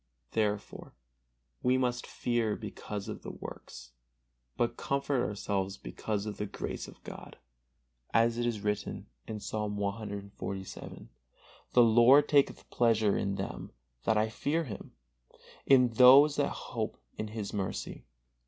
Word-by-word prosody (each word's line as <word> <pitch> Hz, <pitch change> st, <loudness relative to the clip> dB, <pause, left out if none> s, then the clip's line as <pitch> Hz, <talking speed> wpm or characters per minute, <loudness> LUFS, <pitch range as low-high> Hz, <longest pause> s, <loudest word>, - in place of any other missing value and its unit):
Therefore 105 Hz, -2 st, -2 dB, 0.7 s
we 125 Hz, +1 st, +3 dB
must 125 Hz, -1 st, -1 dB
fear 120 Hz, -3 st, 0 dB
because 105 Hz, -1 st, -6 dB
of -, -, -6 dB
the -, -, -7 dB
works, -, -, -9 dB, 0.7 s
but 120 Hz, 0 st, +1 dB
comfort 140 Hz, -1 st, 0 dB
ourselves 100 Hz, -1 st, -2 dB
because 100 Hz, -, -4 dB
of 105 Hz, -1 st, -5 dB
the 105 Hz, -, -3 dB
grace -, -, -5 dB
of -, -, -15 dB
God, -, -, -10 dB, 0.7 s
as 115 Hz, +1 st, +3 dB
it 120 Hz, -, +1 dB
is 110 Hz, -4 st, -2 dB
written, 105 Hz, 0 st, -2 dB, 0.3 s
Psalm 105 Hz, 0 st, -3 dB
cxlvii: 100 Hz, -2 st, -5 dB, 0.7 s
"The 125 Hz, -, +7 dB
Lord 120 Hz, +6 st, +6 dB
taketh 140 Hz, -2 st, +2 dB
pleasure 110 Hz, -4 st, +3 dB
in 100 Hz, 0 st, -1 dB
them -, -, -5 dB, 0.3 s
that 110 Hz, -, +2 dB
I 110 Hz, +1 st, +3 dB
fear 150 Hz, +8 st, -1 dB
Him, 110 Hz, -9 st, -8 dB, 0.7 s
in 125 Hz, -2 st, +6 dB
those 130 Hz, +5 st, +7 dB
that -, -, +2 dB
hope -, -, -4 dB, 0.2 s
in 110 Hz, -, -2 dB
His 105 Hz, -2 st, -5 dB
mercy." 95 Hz, -2 st, -4 dB
110 Hz, 130 wpm, -31 LUFS, 100-120 Hz, 0.7 s, The